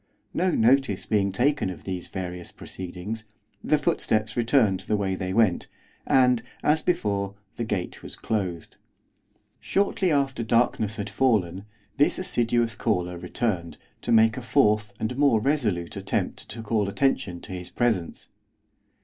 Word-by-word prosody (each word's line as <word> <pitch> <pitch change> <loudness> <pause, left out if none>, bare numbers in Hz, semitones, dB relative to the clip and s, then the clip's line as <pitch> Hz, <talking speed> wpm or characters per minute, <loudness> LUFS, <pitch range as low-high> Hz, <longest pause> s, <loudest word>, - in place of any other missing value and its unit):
No 185 +2 +1
notice 125 - +3
being 100 -2 +1
taken 135 +2 +1
of 90 - -8
these 90 -2 -5
various 90 -2 -6
proceedings, 95 +5 -7 0.4
the 150 - +3
footsteps 110 -9 0
returned 115 -5 +3
the 105 +3 -1
way 95 -2 -1
they 95 0 -3
went, 100 -3 +2 0.4
and, 125 -2 +4 0.2
as 155 +1 +3
before, 100 - -1 0.2
the 120 - -3
gate 100 -5 -3
was - - -8
closed. 95 -7 -3 0.8
Shortly 195 -2 +1
after 135 -4 +1
darkness 110 -2 +1
had 100 -1 -4
fallen 100 -8 +1 0.3
this 145 - +3
assiduous 120 -8 +1
caller 90 -6 -1
returned, 90 -2 -2 0.2
to - - -3
make 110 0 +5
a - - -3
fourth 105 -3 +2
and 110 +3 -2
more 140 -6 +5
resolute 105 - 0
attempt - - -3
to 115 +1 -7
call 105 -2 0
attention 120 -6 0
to - - -9
his 90 -1 -6
presence. 110 -9 -1
110 Hz, 140 wpm, -26 LUFS, 95-125 Hz, 0.8 s, make